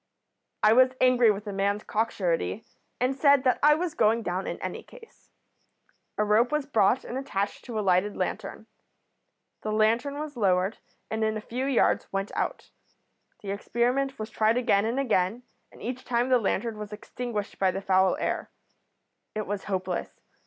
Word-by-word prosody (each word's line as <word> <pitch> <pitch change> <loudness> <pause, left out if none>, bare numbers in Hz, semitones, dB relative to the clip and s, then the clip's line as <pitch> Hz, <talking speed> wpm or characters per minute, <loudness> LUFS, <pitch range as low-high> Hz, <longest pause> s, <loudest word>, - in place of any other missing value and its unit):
"I 215 - +7
was 255 +2 +5
angry 250 -2 +5
with 205 0 -1
the 205 - -5
man's 200 +2 0
cock 225 +2 0
surety, 185 +2 -1 0.4
and 255 +2 +1
said 280 -1 +4
that 255 -2 +2
I 300 +1 +6
was 340 0 -2
going 230 -6 +2
down 185 0 -2
in - - -4
any - - -5
case. 460 -2 -17 0.9
A 210 - +2
rope 220 +5 +3
was 300 -2 0
brought 235 -3 +2
and 255 - -4
attached 205 -7 -3
to 235 -3 -5
a - - +1
lighted 190 +1 +1
lantern. - - -4 1.0
The 215 - -3
lantern 230 +6 +1
was 300 -1 -5
lowered, 190 -2 +1 0.3
and 220 0 -1
in 220 0 0
a - - -3
few 250 +5 -4
yards 270 -4 +2
went 195 +1 -2
out. - - -3 0.7
The 200 - -4
experiment 250 +6 0
was 220 0 -6
tried 220 +2 +2
again 220 -5 +2
and 235 +4 -1
again, 225 -2 0 0.3
and - - -14
each 250 +2 -4
time 245 0 0
the 255 -1 +5
lantern 225 +1 -1
was 210 0 -7
extinguished 210 0 -5
by 190 - +3
the 190 - -2
foul 190 -1 +3
air. - - -2 0.9
It 215 -1 -2
was 205 0 -4
hopeless. 185 -2 -3
220 Hz, 175 wpm, -27 LUFS, 200-255 Hz, 1.0 s, I